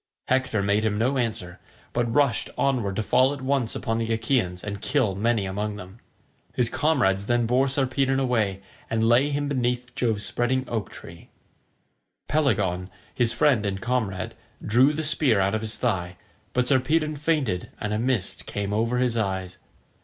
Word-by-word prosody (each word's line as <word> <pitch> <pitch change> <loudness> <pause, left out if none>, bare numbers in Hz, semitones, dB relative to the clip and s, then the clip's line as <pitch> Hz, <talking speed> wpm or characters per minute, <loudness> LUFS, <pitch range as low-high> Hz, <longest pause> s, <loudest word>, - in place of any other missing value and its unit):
Hector 130 -5 +1
made 100 +2 +2
him 105 -2 0
no 130 +5 +1
answer, 100 -6 -3 0.3
but 120 -1 0
rushed 140 -1 +2
onward 120 -8 0
to 110 - -1
fall 130 +5 +3
at 140 - -8
once 130 -3 0
upon 115 0 -2
the 115 0 -2
Achaeans 110 -6 0
and 100 -1 -5
kill 130 -4 +1
many 110 +1 0
among 105 +2 -3
them. 95 +2 -11 0.6
His 120 -2 +3
comrades 125 -10 +1
then 120 -1 +2
bore 125 +4 +2
Sarpedon 135 0 +1
away 110 -7 0 0.3
and 115 0 +1
laid 130 +5 +3
him 145 0 -1
beneath 125 -2 -1
Jove's 115 -5 0
spreading 130 +2 0
oak 110 -4 -3
tree. 85 0 -12 1.0
Pelagon, 100 - +1 0.2
his 120 -2 +1
friend 125 -2 +3
and 100 -1 -2
comrade, 120 -5 -2 0.3
drew 125 +7 +4
the 155 +1 -3
spear 145 -7 +3
out 95 +1 +1
of 110 - -1
his 110 0 -4
thigh, 90 -7 -1 0.4
but 125 0 +1
Sarpedon 150 +4 +2
fainted 145 - -1
and 105 0 -2
a 105 - 0
mist 120 -5 -2
came 100 0 -3
over 115 +3 +1
his 125 -2 +1
eyes. 95 -3 -2
115 Hz, 170 wpm, -25 LUFS, 100-130 Hz, 1.0 s, drew